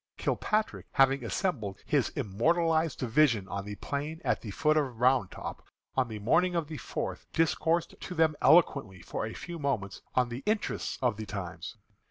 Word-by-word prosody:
Kilpatrick, 215 0 -1
having 135 -1 +4
assembled 115 - -2
his - - +2
immortalized 160 - +1
division 120 -5 +3
on 100 0 -4
the 105 0 -5
plain 145 +7 -4
at - - +1
the 110 - -7
foot 155 +9 +2
of 135 -7 0
Round 125 -6 +4
Top, - - -7 0.3
on 130 -2 +1
the 110 -2 -6
morning 175 - +2
of 165 -2 +1
the 155 0 -7
fourth, - - -4
discoursed 165 +1 +1
to 180 - -6
them 160 -2 +3
eloquently 140 - +4
for - - -3
a 110 - -7
few 170 -1 -7
moments 115 -9 -2
on 125 -1 +3
the 120 +2 -5
interests 215 0 -1
of 120 -4 +2
the 110 -1 -6
times. 95 -4 -6
135 Hz, 175 wpm, -30 LUFS, 110-160 Hz, 0.3 s, having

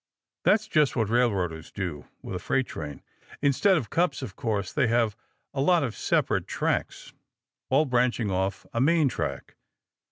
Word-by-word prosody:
That's 215 0 +4
just 155 -8 +2
what 110 -4 0
railroaders 95 -9 0
do 90 -7 -5 0.2
with - - -6
a - - -3
freight 135 -1 0
train. 75 - -7 0.4
Instead 150 +7 +3
of 125 - -4
cups, 165 -5 +1
of 95 - -7
course, 105 -5 -2
they 140 -5 +2
have 115 -2 +2 0.4
a 135 - -1
lot 175 +2 +4
of 120 -5 -3
separate - - 0
tracks, - - -2 0.6
all 140 +4 +4
branching 120 -4 +1
off 95 +1 -1
a 115 - 0
main 155 0 +4
track. - - -4
120 Hz, 160 wpm, -27 LUFS, 100-140 Hz, 0.6 s, That's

